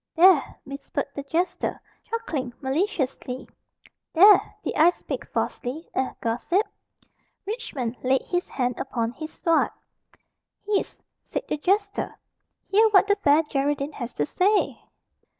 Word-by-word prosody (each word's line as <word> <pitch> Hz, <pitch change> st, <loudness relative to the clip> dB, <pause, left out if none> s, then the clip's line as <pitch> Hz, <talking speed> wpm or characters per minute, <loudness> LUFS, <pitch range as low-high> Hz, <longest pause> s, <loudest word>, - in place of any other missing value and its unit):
"There!" 345 Hz, -3 st, +5 dB
whispered 275 Hz, +1 st, -4 dB
the 280 Hz, -, -4 dB
jester, 350 Hz, +5 st, -1 dB, 0.3 s
chuckling 315 Hz, -, -3 dB
maliciously, 270 Hz, -4 st, -2 dB, 0.7 s
"there! 400 Hz, +5 st, +7 dB
did -, -, -2 dB
I 320 Hz, +3 st, +6 dB
speak 355 Hz, -, -5 dB
falsely 285 Hz, +7 st, -3 dB
eh, 260 Hz, -, -1 dB
gossip?" 245 Hz, -, 0 dB, 0.8 s
Richmond 295 Hz, -, -4 dB
laid 260 Hz, +1 st, +2 dB
his 355 Hz, 0 st, -2 dB
hand 250 Hz, -2 st, -1 dB
upon 230 Hz, -4 st, -2 dB
his 310 Hz, +5 st, -7 dB
sword. 330 Hz, -2 st, +2 dB, 1.0 s
"Hist!" 410 Hz, -1 st, -1 dB, 0.2 s
said -, -, -4 dB
the -, -, -1 dB
jester; 400 Hz, +6 st, 0 dB, 0.6 s
"hear 440 Hz, +3 st, +6 dB
what 405 Hz, -2 st, +6 dB
the 405 Hz, 0 st, +3 dB
Fair 300 Hz, -4 st, +4 dB
Geraldine 285 Hz, 0 st, -1 dB
has 240 Hz, -4 st, -6 dB
to 145 Hz, -, 0 dB
say." 395 Hz, -, +1 dB
310 Hz, 125 wpm, -25 LUFS, 265-385 Hz, 1.0 s, there